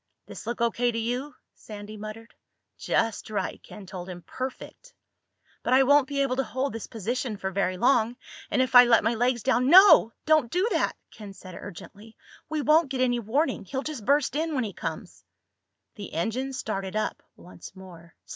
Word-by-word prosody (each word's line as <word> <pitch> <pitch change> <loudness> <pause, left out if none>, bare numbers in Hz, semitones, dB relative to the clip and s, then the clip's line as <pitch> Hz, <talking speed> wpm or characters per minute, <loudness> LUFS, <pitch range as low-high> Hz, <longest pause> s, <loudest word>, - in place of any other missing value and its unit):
"This - - -10
look 235 0 -4
O.K. 235 +1 +1
to - - -3
you?" 245 +6 -3 0.2
Sandy 210 0 -10
muttered. 215 +2 -9 0.4
"Just 225 -2 -1
right," 210 - -3
Ken 210 -2 -12
told 185 0 -8
him. 175 -1 -9
"Perfect." 265 - -8 0.7
"But 250 - 0
I 270 - +6
won't 285 0 +4
be 280 0 0
able 260 -2 -1
to 270 - +1
hold 265 +1 -3
this 225 - -6
position 230 +1 -3
for 190 0 -4
very 185 -1 -1
long. 240 +1 +2 0.3
And 260 - +2
if 255 - -4
I 245 0 +10
let 230 -3 +4
my 225 +2 +1
legs 240 0 0
down—" 255 0 +2
"No! 375 - +8
Don't 310 -6 +3
do 365 +5 +1
that!" - - 0 0.2
Ken 205 -3 -11
said 185 -1 -12
urgently. 205 +4 -11 0.3
"We 305 -1 -2
won't 305 0 +4
get 260 -1 -2
any 245 -1 +2
warning. 255 +6 -1
He'll 265 +8 -4
just 300 -8 -6
burst 280 +2 +1
in 315 0 -1
when 260 - 0
he 205 -3 -5
comes." - - -7 0.7
The 205 -2 -9
engine 240 +11 -2
started 195 -6 -4
up 215 - -2
once 180 +2 -13
more. 170 -3 -14
235 Hz, 185 wpm, -26 LUFS, 210-270 Hz, 0.7 s, I